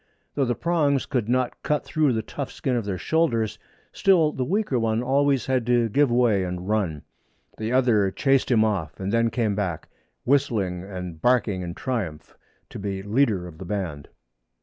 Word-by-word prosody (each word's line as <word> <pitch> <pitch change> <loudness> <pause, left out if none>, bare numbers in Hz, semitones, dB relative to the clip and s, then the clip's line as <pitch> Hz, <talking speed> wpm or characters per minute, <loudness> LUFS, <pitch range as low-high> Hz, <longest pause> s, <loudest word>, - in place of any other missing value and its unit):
Though 140 - +1
the 120 -1 0
prongs 150 -5 +1
could 120 -4 -2
not 125 0 0
cut 150 -1 -1
through 155 -5 +1
the 110 -1 -1
tough 140 +4 -6
skin 130 -2 -2
of 115 -3 -1
their 100 -2 -2
shoulders, 115 - 0 0.3
still 170 -6 +4
the 130 - -2
weaker 180 - 0
one 115 +1 0
always 135 -1 +2
had 130 -2 +1
to 120 -2 +3
give 140 +5 +3
way 120 -5 +3
and 90 0 -5
run. 95 -9 -1 0.6
The 110 +1 -2
other 120 -6 +3
chased 135 +5 +1
him 110 -3 +4
off 95 -9 -2
and 95 +2 -3
then 115 0 +3
came 115 -3 0
back, 95 -6 -3 0.3
whistling 110 -10 +1
and 90 -4 -7
barking 115 -5 +2
in 85 -1 -5
triumph, 95 - -4 0.4
to - - -7
be 100 -1 -4
leader 105 -4 +1
of 85 -2 -11
the 95 - -7
band. 85 -7 -4
115 Hz, 180 wpm, -24 LUFS, 95-130 Hz, 0.6 s, still